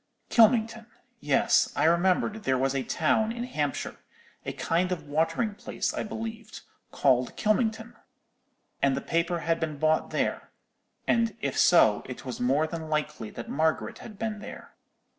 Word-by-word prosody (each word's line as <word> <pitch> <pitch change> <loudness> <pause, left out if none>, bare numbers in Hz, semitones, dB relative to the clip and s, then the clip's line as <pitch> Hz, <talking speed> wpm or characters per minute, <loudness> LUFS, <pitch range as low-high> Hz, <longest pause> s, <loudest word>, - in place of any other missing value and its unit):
Kylmington; 230 0 +4 0.3
yes, - - +3
I - - +1
remembered 180 +5 +2
there 130 -8 +1
was 135 +1 +1
a 135 - 0
town 195 - +1
in 235 +1 -4
Hampshire,—a 150 - -5
kind 180 +3 0
of 170 -4 -3
watering 165 +9 0
place, - - -3
I - - -2
believed,—called 215 - -2
Kylmington! 225 +1 0 0.9
And 135 -1 +2
the - - -2
paper 170 +1 -1
had 165 0 0
been 155 -2 -3
bought 155 +2 +1
there—and 230 -1 -3
if - - -2
so, 110 -12 +5
it 125 +1 -8
was 125 - -5
more 135 +5 +2
than 160 -1 -6
likely 150 -7 -2
that 120 - -8
Margaret 160 +2 -1
had 215 -3 -11
been 220 -1 -3
there. - - -10
170 Hz, 140 wpm, -27 LUFS, 150-220 Hz, 0.9 s, so